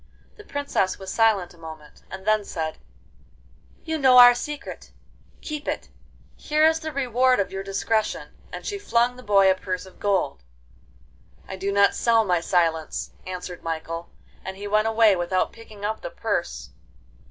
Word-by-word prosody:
The 425 - -13
Princess 285 - -1
was 190 -1 -7
silent 210 -6 +2
a 170 - -20
moment, 160 -2 -11
and 190 0 -8
then 215 -1 +3
said: 160 -4 -4 1.0
'You 320 -1 -2
know 260 -2 +6
our 245 0 +10
secret!—keep 295 +2 -8
it. - - -3 0.5
Here 305 +1 +2
is 320 0 +4
the 315 -1 -5
reward 255 -2 +2
of 200 - -1
your 195 - -4
discretion.' 210 +3 -1 0.2
And - - -8
she 405 -1 -3
flung 240 -9 +1
the 255 - -11
boy 195 -3 +5
a - - +5
purse 185 -1 -4
of 190 - -16
gold. 195 - 0 1.0
'I 190 - -6
do 195 +1 -2
not 200 0 +4
sell 230 -2 +3
my 180 -3 +2
silence,' 165 -3 0 0.2
answered 180 -1 -6
Michael, 165 +1 -5 0.3
and 190 0 -6
he 205 - -7
went 215 +2 +2
away 225 -2 +5
without 180 +1 -1
picking 215 -3 -10
up 220 +1 -2
the - - -5
purse. - - -3
205 Hz, 165 wpm, -24 LUFS, 185-245 Hz, 1.0 s, our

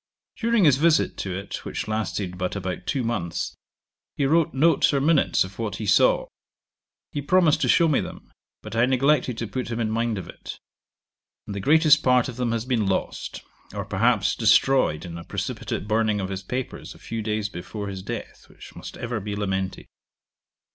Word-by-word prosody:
During 230 -2 +2
his 145 -5 +6
visit 160 +2 +3
to 95 -2 -3
it, 100 +1 -6
which - - -4
lasted 105 -4 -2
but 90 +1 -3
about 95 -1 -4
two 130 +5 0
months, 90 -8 -3 0.6
he 140 - +1
wrote 160 +3 +3
notes 160 +5 +3
or - - +3
minutes 150 +1 +3
of 95 +3 -11
what 105 -3 -2
he 110 - -5
saw. 100 0 +4 0.9
He 145 - -3
promised 165 +1 +3
to - - +1
show 170 - +5
me 150 - +2
them, - - -9 0.3
but - - -7
I 115 +2 +4
neglected 130 -1 +2
to 115 - -2
put 125 +2 -4
him 115 0 -3
in 110 -2 0
mind 115 -1 0
of 95 - -6
it; - - -9 0.9
and 105 - -6
the 100 - -4
greatest 155 - +5
part 125 -1 +3
of 125 - -7
them 125 -2 0
has 115 0 -1
been 120 -6 0
lost, 95 - -3 0.3
or - - -3
perhaps, - - +2
destroyed 130 - +3
in 85 -1 -7
a - - -9
precipitate 100 - -4
burning 110 -1 +1
of 95 -1 -3
his 95 -1 -4
papers 125 +6 -5
a - - -14
few 115 -1 -5
days 105 -1 -1
before 100 +2 -6
his 95 -1 -5
death, - - -7
which - - -14
must - - -9
ever 120 -1 -3
be 105 0 -4
lamented. 95 -2 -2
115 Hz, 190 wpm, -24 LUFS, 100-135 Hz, 0.9 s, his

